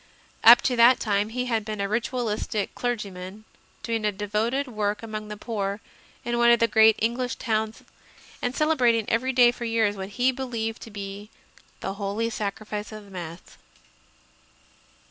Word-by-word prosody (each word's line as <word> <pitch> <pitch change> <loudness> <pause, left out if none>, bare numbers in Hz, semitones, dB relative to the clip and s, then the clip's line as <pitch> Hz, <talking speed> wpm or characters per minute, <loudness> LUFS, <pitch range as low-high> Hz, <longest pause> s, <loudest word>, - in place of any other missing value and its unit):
Up 235 +2 +9
to 255 - +1
that 240 +2 +7
time 205 0 0
he 250 +2 -2
had 225 -3 0
been 215 -1 -5
a 200 - 0
Ritualistic 220 -1 -2
clergyman, 205 -4 -5 0.4
doing 230 -2 -2
a 210 - +2
devoted 215 +7 -1
work 210 -2 -2
among 215 -1 -6
the 210 0 -7
poor 200 -2 -3 0.5
in 240 0 -1
one 235 0 +5
of 235 -1 +6
the 230 - +4
great 220 0 +6
Eng 230 +2 0
lish 250 -1 -2
towns 220 -2 -2 0.6
and 245 +1 -2
celebrating 245 -8 +2
every 255 +4 +1
day 245 -2 +6
for 240 -1 -7
years 225 -3 +1
what 190 0 -6
he 250 +1 +3
believed 235 -4 -4
to - - -9
be 200 0 -7 0.5
the 195 - -3
Holy 210 +4 -1
Sacrifice 210 0 -4
of 215 -1 -9
the 200 - -16
Mass. 170 -2 -9
220 Hz, 165 wpm, -25 LUFS, 205-240 Hz, 0.6 s, Up